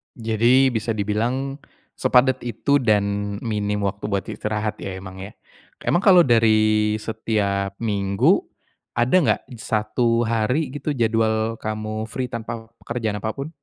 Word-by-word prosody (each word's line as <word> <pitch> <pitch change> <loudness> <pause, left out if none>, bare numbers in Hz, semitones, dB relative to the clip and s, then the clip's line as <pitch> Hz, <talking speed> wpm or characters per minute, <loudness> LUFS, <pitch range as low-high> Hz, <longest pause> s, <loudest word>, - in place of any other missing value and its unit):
Jadi 120 +4 +3
bisa 110 0 -2
dibilang, 120 +7 -1 0.4
sepadat 130 +1 +3
itu 125 +5 +1
dan 100 -3 0
minim 105 -2 -2
waktu 100 0 -2
buat 100 -2 0
istirahat 105 0 -3
ya 95 -1 -5
emang 95 0 -9
ya. 95 +3 -8 0.5
Emang 175 - +2
kalau 185 -3 +7
dari 110 -3 +3
setiap 100 -3 -1
minggu, 100 -3 +2 0.6
ada 120 +8 +2
enggak 175 - +2 0.2
satu 115 +2 0
hari 115 +6 0
gitu, 145 +1 -3
jadwal 110 -1 +1
kamu 110 0 -4
free 125 +2 -4
tanpa 115 -1 -6
pekerjaan 115 -3 -3
apapun? 125 +8 -4
110 Hz, 130 wpm, -22 LUFS, 105-120 Hz, 0.6 s, kalau